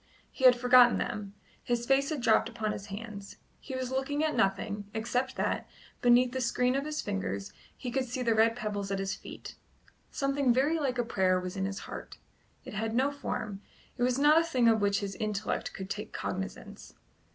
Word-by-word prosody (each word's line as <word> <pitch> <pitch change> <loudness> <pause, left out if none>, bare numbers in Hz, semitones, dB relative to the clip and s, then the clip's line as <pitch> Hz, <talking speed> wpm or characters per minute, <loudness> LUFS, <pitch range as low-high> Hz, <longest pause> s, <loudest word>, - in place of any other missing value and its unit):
He 260 - -1
had 250 -1 +9
forgotten 245 0 +6
them; 205 -1 -4 0.3
his 240 -1 -1
face 270 +2 +3
had 305 -5 -2
dropped 230 -1 +3
upon 220 -2 -2
his 200 -1 -6
hands; 200 -1 -8 0.2
he 265 - -7
was 255 -1 -3
looking 270 +3 -1
at 310 - +1
nothing, 205 -1 0
except 250 +4 -1
that, - - -1 0.3
beneath 245 +1 +5
the 260 0 -2
screen 250 +1 +1
of 275 +1 -1
his 305 0 -3
fingers, 95 +1 -3 0.2
he 250 - -5
could 265 +1 0
see 250 +1 -3
the 230 -2 +3
red 225 +1 +4
pebbles 205 -4 -3
at 195 - -1
his 195 0 -2
feet. - - -9 0.6
Something 275 -2 +1
very 285 +7 +2
like 265 -4 -1
a 240 - 0
prayer 185 -4 +2
was 180 +1 -5
in 190 -1 -1
his 195 0 -4
heart; - - -8 0.5
it - - -8
had 220 +2 -2
no 265 +3 +2
form; 210 -7 -4 0.3
it - - -8
was 250 +1 +2
not 300 +3 +6
a - - 0
thing 255 -8 +2
of 220 -2 +4
which 200 0 +2
his 200 -1 -4
intellect 210 -1 -2
could 190 - -7
take 210 +1 -5
cognizance. 190 +1 -6
235 Hz, 200 wpm, -30 LUFS, 205-260 Hz, 0.6 s, had